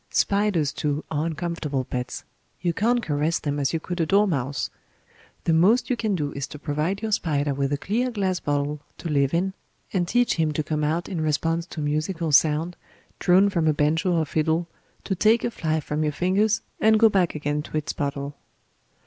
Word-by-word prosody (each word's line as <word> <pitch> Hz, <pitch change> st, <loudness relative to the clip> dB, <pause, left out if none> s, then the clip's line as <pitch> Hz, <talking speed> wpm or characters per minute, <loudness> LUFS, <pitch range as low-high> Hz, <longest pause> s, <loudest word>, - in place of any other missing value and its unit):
Spiders, 200 Hz, -8 st, +1 dB
too, 150 Hz, 0 st, -2 dB
are 155 Hz, +1 st, 0 dB
uncomfortable 160 Hz, -4 st, -2 dB
pets; 125 Hz, 0 st, -4 dB, 0.4 s
you 175 Hz, -2 st, 0 dB
can't 235 Hz, +6 st, +1 dB
caress 155 Hz, 0 st, 0 dB
them 145 Hz, -1 st, -2 dB
as 140 Hz, -1 st, +1 dB
you 165 Hz, -, -1 dB
could 175 Hz, +2 st, -4 dB
a -, -, +2 dB
dormouse; 155 Hz, -10 st, +1 dB, 0.7 s
the 165 Hz, -, +2 dB
most 205 Hz, +11 st, +4 dB
you -, -, +3 dB
can 220 Hz, -4 st, -1 dB
do 145 Hz, -4 st, -2 dB
is 140 Hz, -1 st, -4 dB
to -, -, -9 dB
provide 155 Hz, +8 st, -2 dB
your 220 Hz, -, -2 dB
spider 145 Hz, -7 st, 0 dB
with 135 Hz, 0 st, -1 dB
a 145 Hz, -, +1 dB
clear 230 Hz, -, -1 dB
glass 190 Hz, -6 st, -1 dB
bottle 145 Hz, 0 st, -1 dB, 0.2 s
to 170 Hz, -, -5 dB
live 140 Hz, -2 st, +2 dB
in, 185 Hz, +3 st, 0 dB, 0.4 s
and 180 Hz, -3 st, +1 dB
teach 245 Hz, +2 st, +2 dB
him 160 Hz, -2 st, +1 dB
to 155 Hz, -, -1 dB
come 150 Hz, 0 st, -2 dB
out 160 Hz, +3 st, 0 dB
in 175 Hz, -5 st, -3 dB
response 165 Hz, +3 st, 0 dB
to 155 Hz, -, -6 dB
a -, -, -2 dB
musical 155 Hz, +2 st, -1 dB
sound, 155 Hz, +4 st, +3 dB, 0.4 s
drawn 185 Hz, +3 st, +5 dB
from 170 Hz, -5 st, +1 dB
a 155 Hz, -, +4 dB
banjo 160 Hz, +5 st, +1 dB
or 165 Hz, -2 st, +2 dB
fiddle, 160 Hz, +3 st, 0 dB, 0.4 s
to 195 Hz, -, -1 dB
take 220 Hz, +4 st, +3 dB
a 240 Hz, -, 0 dB
fly 160 Hz, -6 st, -1 dB
from 150 Hz, 0 st, -3 dB
your 150 Hz, -1 st, +1 dB
fingers 195 Hz, +7 st, +2 dB, 0.2 s
and 220 Hz, 0 st, +5 dB
go 225 Hz, -, +7 dB
back 190 Hz, -6 st, +1 dB
again 150 Hz, 0 st, -1 dB
to 155 Hz, -, -5 dB
its 150 Hz, -, -2 dB
bottle. 140 Hz, 0 st, -3 dB
160 Hz, 200 wpm, -24 LUFS, 150-190 Hz, 0.7 s, go